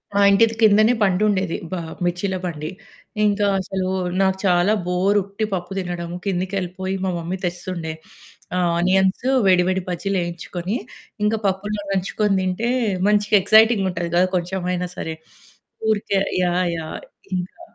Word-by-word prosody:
మా 200 - +4
ఇంటిది 225 +3 +4
కిందనే 215 +2 +6
బండుండేది, 190 -2 +1
బ - - -4 0.3
మిర్చిల 180 +2 -1
బండి. 155 -3 -4 0.6
ఇంకా 205 0 +2
అసలూ 190 0 -3 0.3
నాకు 190 0 +2
చాలా 180 +2 +3
బోరు 190 +3 +2
ఉట్టి 200 +3 -3
పప్పు 175 0 -3
దినడము. 175 -1 -4
కిందకెళ్ళిపోయి 190 0 -2
మా 190 - 0
మమ్మీ 170 +3 -4
తెస్తుండే. 175 -2 -4 0.6
ఆహ్, 175 -1 +2
ఆనియన్స్, 190 +5 +2 0.2
వేడి, 180 -1 +5
వేడి 190 0 0
బజ్జీలేయించుకొని, 180 +1 -3 0.5
ఇంక 210 - +2
పప్పులో 205 +2 -2
నంచుకోని 195 +1 0
తింటే, 185 +6 -1 0.4
మంచిగ 210 0 +2
ఎక్సైటింగ్‌గా 220 0 +5
ఉంటది 170 -1 -3
గదా! 180 +1 +4
కొంచెమైనా 180 0 -2
సరే. 160 0 -4 0.7
ఊరికే 205 -2 +1 0.2
యాహ్! 180 +1 +1
యాహ్! 160 -1 -6 0.4
ఇంకా 180 - -6
185 Hz, 130 wpm, -21 LUFS, 175-200 Hz, 0.7 s, కిందనే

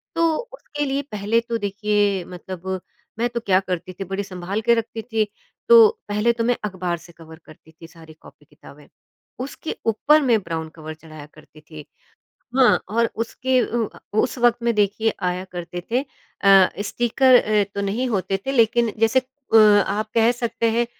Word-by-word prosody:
तो 335 - +1 0.3
उसके 295 -11 -5
लिए 275 +1 -1
पहले 210 +3 +1
तो 235 0 -3
देखिए 205 -2 0
मतलब 180 0 -9 0.5
मैं 240 - +2
तो 240 0 -3
क्या 190 -4 +2
करती 185 -1 -5
थी 195 - -6
बड़ी 195 +1 -3
सँभाल 190 +2 -4
के 235 0 +4
रखती 230 0 -4
थी, 225 -2 -1 0.4
तो 460 -2 +9 0.2
पहले 210 +3 +2
तो 230 -1 -2
मैं 245 +1 +2
अख़बार 180 -3 -3
से 170 - -16
कवर 160 -1 -13
करती 155 +1 -17
थी 165 +1 -14
सारी 165 -2 -15
कॉपी-किताबें 150 -1 -18 0.6
उसके 280 +3 -6
ऊपर 300 +7 +3
मैं 240 -5 +3
ब्राउन 160 -1 -4
कवर 155 -1 -8
चढ़ाया 155 -2 -12
करती 155 0 -18
थी। 150 -1 -12 0.7
हाँ, 260 -2 +5
और 230 +2 +1
उसके 255 +3 -1
अ, 235 -2 -2 0.2
उस 255 - 0
वक़्त 240 0 +3
में 235 -1 +1
देखिए 210 +2 +1
आया 180 +1 -1
करते 175 0 -5
थे 245 - +2
अ, 195 -8 +2
स्टीकर 240 +4 +2
अ, 210 -1 +2
तो 200 - -2
नहीं 215 +6 -1
होते 195 -3 -1
थे 270 - -1
लेकिन 235 -2 +2
जैसे 225 +3 +3
अ, 260 -2 -3
आप 210 0 +4
कह 230 +1 +4
सकते 230 -1 -1
हैं 235 +1 +1
210 Hz, 175 wpm, -22 LUFS, 180-235 Hz, 0.7 s, तो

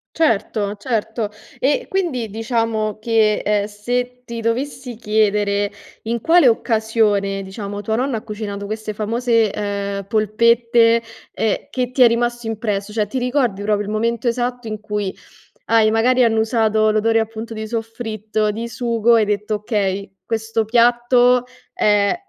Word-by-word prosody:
Certo. 215 -7 0
Certo. 225 -1 -2 0.3
E, 280 +3 +1
quindi 300 - -1
diciamo 225 -1 -1
che, 220 -2 +2
ehm, 205 -1 +2
se 245 +4 -3
ti 235 -1 -6
dovessi 250 +1 -3
chiedere 210 -2 +1 0.3
in 230 0 -2
quale 330 -4 +5
occasione, 220 -4 +1
diciamo, 200 +1 -6
tua 220 +2 -1
nonna 255 -2 0
ha - - -6
cucinato 205 -2 -5
queste 215 0 -4
famose, 230 0 +1
uhm, 200 -1 -3
polpette, 230 +2 +3 0.3
ehm, 220 -2 -1
che 250 -1 -2
ti 255 - 0
è 245 - +9
rimasto 240 0 -1
impresso? 210 -2 -3
Cioè, 215 -2 +1
ti 260 - -3
ricordi 245 -5 0
proprio 205 0 0
il 210 - -5
momento 235 +2 -1
esatto 245 0 -1
in 215 -1 -4
cui 210 -2 -3 0.5
hai, 225 -1 +4
magari, 250 +3 +3
annusato 220 -1 +2
l'odore 225 +1 +2
appunto 225 +1 -5
di 220 0 -5
soffritto, 220 -2 -3
di 230 +2 -5
sugo 235 0 +2
e - - +4
hai 210 - +2
detto: 210 +1 -1
"Okay, 200 -2 -2
questo 225 0 -1
piatto 245 +2 +4 0.3
è 205 +1 +2
225 Hz, 145 wpm, -20 LUFS, 210-235 Hz, 0.5 s, è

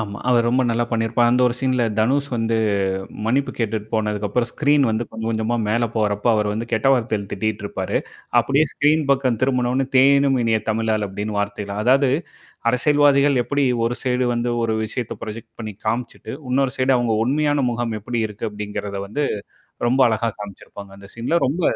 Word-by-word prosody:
ஆமா. 105 -2 -5
அவர் 120 -2 +3
ரொம்ப 130 +2 +2
நல்லா 120 +1 +1
பண்ணியிருப்பார். 115 +1 +2
அந்த 125 +1 +3
ஒரு 120 - 0
சீன்ல 130 -2 +1 0.2
தனுஷ் 140 +6 +2
வந்து 115 -1 0 0.7
மன்னிப்பு 135 +5 +1
கேட்டுட்டு 110 -2 -2
போனதுக்கப்புறம் 105 +2 0
ஸ்க்ரீன் 145 -1 +3
வந்து 110 +2 -1
கொஞ்சம் 110 0 -5
கொஞ்சமா 110 +1 -1
மேல 120 +2 +1
போறப்போ 105 +1 0
அவர் 105 -1 +1
வந்து 110 +2 -3
கெட்ட 110 +4 +2
வார்த்தைல 110 -5 -2
திட்டிட்டு 110 -2 -2
இருப்பாரு. 100 - -2 0.4
அப்படியே 135 +6 +2
ஸ்க்ரீன் 150 +1 +2
பக்கம் 130 -4 +2
திரும்புவுன 125 -2 +1
உடனே 135 +1 0
"தேனினும் 140 0 +5
இனிய 110 -1 +1
தமிழாள்" 110 -1 0
அப்டின்னு 105 +2 -4
வார்த்தைல 100 0 -3
அதாவது 130 +2 +4 0.6
அரசியல்வாதிகள் 140 0 +4
எப்படி 140 +3 0 0.2
ஒரு 120 +1 -1
சைடு 125 -1 +1
வந்து 120 0 -1
ஒரு 110 -1 0
விஷயத்த 115 +2 -4
ப்ராஜக்ட் 110 +1 -8
பண்ணி 110 -2 -5
காமிச்சுட்டு, 115 0 -3 0.2
இன்னொரு 135 0 +1
சைடு 130 0 +2
அவங்க 120 -3 +1
உண்மையான 145 +4 +1 0.2
முகம் 115 -1 -2
எப்படி 120 +3 -4
இருக்கு? 105 0 -11
அப்டிங்கிறத 105 -1 -5
வந்து 145 +8 -2 0.6
ரொம்ப 130 +3 +1
அழகா 115 +1 0
காமிச்சிருப்பாங்க 100 0 -10
அந்த 100 0 -13
சீன்ல. 120 +9 0
ரொம்ப 155 +7 -2
120 Hz, 170 wpm, -21 LUFS, 110-130 Hz, 0.7 s, தேனினும்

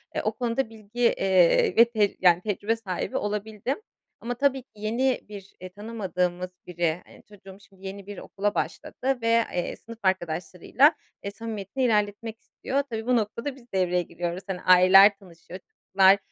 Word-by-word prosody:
eee, - - 0
o - - 0
konuda 245 0 -2
bilgi, 220 +1 -12
eee, 190 -7 +3
ve 230 - +9
tec 215 -4 0
yani 175 -1 +5
tecrübe 210 +2 -1
sahibi 195 -6 -4
olabildim 210 - -3 0.4
ama, 240 +2 -4
tabii, 270 +1 +1
ki - - -55
yeni 235 +5 0
bir, 200 -2 -11
eee, 185 - -7
tanımadığımız 185 -4 -3 0.2
biri, 175 -1 -1
eee, - - -17
çocuğum 195 -2 -14
şimdi 195 0 -17
yeni 195 0 -8
bir 205 - -8
okula 205 +1 -3
başladı 260 -1 -3
ve, 230 - -1 0.3
eee, 175 - -2
sınıf 230 0 -13
arkadaşlarıyla, 185 - +1 0.3
eee, 200 - -4
samimiyetini 220 +3 -5
ilerletmek 220 0 0
istiyor. 275 +2 -3
Tabii, 225 -1 -4
bu 250 - +2
noktada 230 +5 -2
biz 245 -3 -19
devreye 180 -1 +1
giriyoruz, 175 +1 -5
hani, 185 -2 -4
aileler 190 +2 +7
tanışıyorlar, 180 -1 -13
çocuklar, 190 +1 +4
205 Hz, 160 wpm, -26 LUFS, 185-230 Hz, 0.4 s, ve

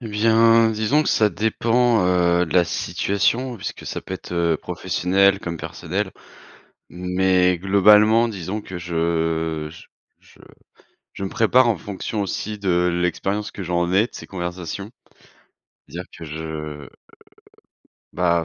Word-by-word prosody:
Et 115 - -7
bien, 115 +1 +4
disons 110 +7 +1
que - - -2
ça 105 - +3
dépend, 115 0 +1
heu, 90 -1 +2
de 80 - -6
la 90 -1 +5
situation 110 - -1
puisque 100 - -7
ça - - -4
peut - - -6
être, - - -9
heu, 85 -2 +1
professionnel, 95 +5 +1
comme 85 -1 -5
personnel. - - -4 0.8
Mais, 90 0 +1
globalement 105 +4 +5
disons 100 0 -5
que 95 - -9
je 80 -2 -1
j 80 - -14 0.3
je - - -22 0.7
je - - -6
me 95 - -3
prépare 120 +4 +3
en 110 - +1
fonction 100 +4 -5
aussi 105 +2 -4
de 90 -2 +1
l'expérience 100 +5 -2
que 100 - -7
j'en 85 0 -1
ai, 95 +3 +4
de - - -32
ces - - -9
conversations. 90 +2 -6 1.0
C'est-à-dire 90 +2 -8
que - - -9
je, 75 0 -7
heu, 75 -2 -7 1.2
bah, 85 -1 +1
95 Hz, 145 wpm, -22 LUFS, 85-105 Hz, 1.2 s, la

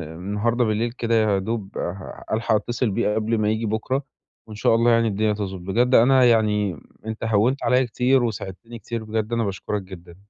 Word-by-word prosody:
النهارده 105 +7 -1
بالليل 115 +2 0
كده 115 -2 -1
يا 105 -3 +2
دوب 105 0 -4
ه 90 +2 -6
هالحق 110 0 +1
اتّصل 120 +1 -1
بيه 105 0 0
قبل 110 +1 0
ما 105 0 +1
ييجي 110 +1 -1
بُكرة 110 +6 -1 0.4
وإن 110 - -9
شاء 105 - +2
الله 115 +1 +3
يعني 115 0 +3
الدنيا 105 +1 +1
تضبُط. 95 -3 -5
بجد 120 +8 +1
أنا 130 +2 +6
يعني 105 - +2 0.3
أنت 110 0 -5
هوِّنت 115 +5 +1
عليّا 125 0 +3
كتير 125 +2 +2
وساعدتني 115 +1 -5
كتير 115 +2 -5
بجد 110 +1 -3
أنا 115 -1 +1
باشكُرك 100 +1 -3
جدًا. 90 -2 -12
110 Hz, 185 wpm, -23 LUFS, 105-115 Hz, 0.4 s, أنا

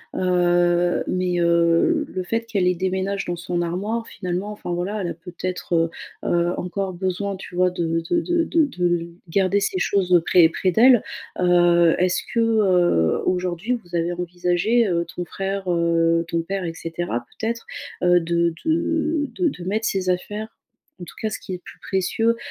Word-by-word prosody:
Heu, 175 -1 +2
mais, 180 -1 0
heu, 170 - +3
le 185 - -4
fait 230 +5 -1
qu'elle 205 -5 0
les 180 0 +2
déménage 190 +2 -1
dans 175 0 -3
son 175 0 -2
armoire, 205 +7 -2
finalement, 185 +2 -4
enfin 210 -4 -6
voilà 190 +5 -2
elle 180 - -2
a - - -3
peut-être, 180 +1 -4
heu, 165 0 +2 0.4
heu, 175 0 +2
encore 190 +2 -3
besoin 190 +2 -2
tu 185 - -10
vois 180 0 +3
de 165 -2 -1
de 345 - +3
de 345 0 +1
de 325 -1 +2
de 175 -8 -1 0.2
garder 195 +3 +2
ces 190 - -1
choses, 185 0 +1
heu, 175 - +8
près 165 0 +5
près 185 +2 0
d'elle. 240 +4 +6 0.4
Heu, 175 -2 +4
est-ce 180 0 +2
que, 235 - +1
heu, 185 - +3
aujourd'hui 185 +6 -1
vous 175 -2 -9
avez 170 +1 0
envisagé, 180 +6 +1
heu, 170 -1 0
ton 180 - -3
frère, 195 +1 -3
heu, 165 -1 +2
ton 170 0 -1
père, 190 +2 -3
et 165 - -3
cetera 165 -6 -4 0.2
peut-être, 230 +1 -3 0.4
heu, 175 0 +5
de 170 0 0
de 320 -2 0
de 360 -3 +1
de 180 -11 -4
mettre 215 +5 -1
ses 185 -1 -1
affaires, 210 +4 -2 0.5
en - - -6
tout - - -13
cas 220 - 0
ce 210 - -5
qui 185 - -7
est - - -1
le 180 - -10
plus - - -13
précieux, 225 +5 0
180 Hz, 185 wpm, -22 LUFS, 175-200 Hz, 0.5 s, heu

